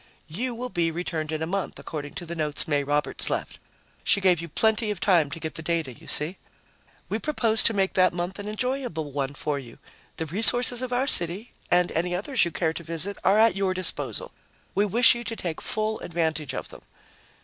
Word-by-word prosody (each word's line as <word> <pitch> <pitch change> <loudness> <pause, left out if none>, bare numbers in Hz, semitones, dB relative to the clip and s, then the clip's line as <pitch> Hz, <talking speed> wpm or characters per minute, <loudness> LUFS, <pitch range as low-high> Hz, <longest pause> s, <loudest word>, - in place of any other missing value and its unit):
"You 235 +10 -2
will 250 +2 -5
be 170 -3 0
returned 160 -2 -4
in 155 0 -2
a - - 0
month, 195 +3 -3
according 145 -2 -7
to 175 - -6
the 170 - -6
notes 150 -2 0
May 145 -2 +1
Roberts 145 +1 -1
left. - - -3 0.4
She - - +3
gave 185 -4 +3
you 170 - -7
plenty 220 +6 +1
of 205 -3 -3
time 175 -6 +3
to 160 +4 -7
get 160 -1 -5
the - - -8
data, 165 -5 -2
you - - -17
see. 155 +6 +2 0.7
We - - -2
propose 230 -8 +5
to 230 - +4
make 195 -1 +1
that 185 -1 +4
month 175 +3 -5
an 205 - -6
enjoyable 215 - -3
one 140 0 -3
for 145 0 -2
you. 120 -4 -12 0.4
The 160 - -3
resources 240 - +4
of 255 -1 -4
our 250 +2 +1
city 185 - +4 0.2
and 175 0 +3
any 175 +2 -1
others 240 +7 +1
you - - -2
care 160 +1 -1
to 170 - -7
visit 170 +5 -1
are 195 +2 +4
at 225 -2 +4
your 195 -1 0
disposal. 185 - 0 0.4
We 205 - +2
wish 230 +5 +5
you 240 0 -5
to 230 - -4
take 170 -7 -5
full 215 0 -2
advantage 160 -4 -2
of - - -6
them." - - -11
180 Hz, 215 wpm, -25 LUFS, 160-215 Hz, 0.7 s, propose